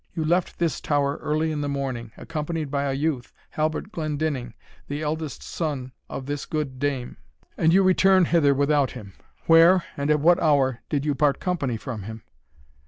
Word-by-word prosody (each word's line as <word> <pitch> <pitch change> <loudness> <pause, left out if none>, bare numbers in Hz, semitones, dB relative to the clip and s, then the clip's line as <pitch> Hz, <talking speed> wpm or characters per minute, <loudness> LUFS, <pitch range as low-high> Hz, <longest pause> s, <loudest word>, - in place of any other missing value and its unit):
You 160 -3 -1
left 175 +3 +1
this 170 -3 -1
tower 145 -1 0
early 155 +1 -1
in 150 -1 -2
the 145 - -2
morning, 130 -5 -3
accompanied 155 -2 -4
by 140 -1 0
a 135 - 0
youth, 135 -3 -2 0.2
Halbert 155 +6 -2
Glendinning, 150 - -3 0.3
the 145 +2 -4
eldest 155 -1 -3
son 140 -6 -4 0.2
of 130 - -6
this 145 0 -4
good 145 -5 -3
dame, 135 -3 -2 0.4
and 160 - +3
you 195 +3 +5
return 185 0 +5
hither 150 -5 +3
without 145 -1 +2
him. 100 -2 -10 0.3
Where, 170 +2 +6
and 140 +1 -2
at 150 0 +4
what 170 +4 +4
hour, 135 -5 +2
did 145 -2 -1
you 150 - +1
part 145 0 +2
company 145 -10 -1
from 110 -1 -6
him?" 110 +3 -8
150 Hz, 175 wpm, -24 LUFS, 135-160 Hz, 0.4 s, Where